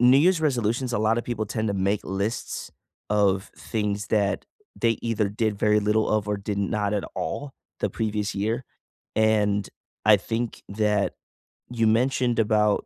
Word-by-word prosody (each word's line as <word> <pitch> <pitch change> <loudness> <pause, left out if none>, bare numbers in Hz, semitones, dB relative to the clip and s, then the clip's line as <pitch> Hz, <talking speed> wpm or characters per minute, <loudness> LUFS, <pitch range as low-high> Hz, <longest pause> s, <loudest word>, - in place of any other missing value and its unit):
New 125 +2 +7
Year's 175 +2 +4
resolutions, 125 -4 0
a 120 - +1
lotta 110 +2 +2
people 115 -3 -3
tend 110 +1 -2
to 100 - 0
make 100 +2 +1
lists 100 +4 -3 0.4
of 100 -2 +2
things 105 -2 -2
that 100 -2 +1 0.4
they 115 -1 +3
either 110 -3 0
did 105 0 -1
very 105 0 +3
little 105 +1 +2
of 105 -1 +1
or 105 - +1
did 100 0 -4
not 105 0 0
at 100 - -1
all 95 - -4 0.3
the - - 0
previous 105 -2 -2
year, 110 +5 -1 0.5
and 105 -2 +2 0.4
I 105 0 +8
think 115 +4 -3
that 105 0 +1 0.6
you 115 -2 +2
mentioned 120 +1 +2
about 105 -1 +3
105 Hz, 160 wpm, -25 LUFS, 100-115 Hz, 0.6 s, I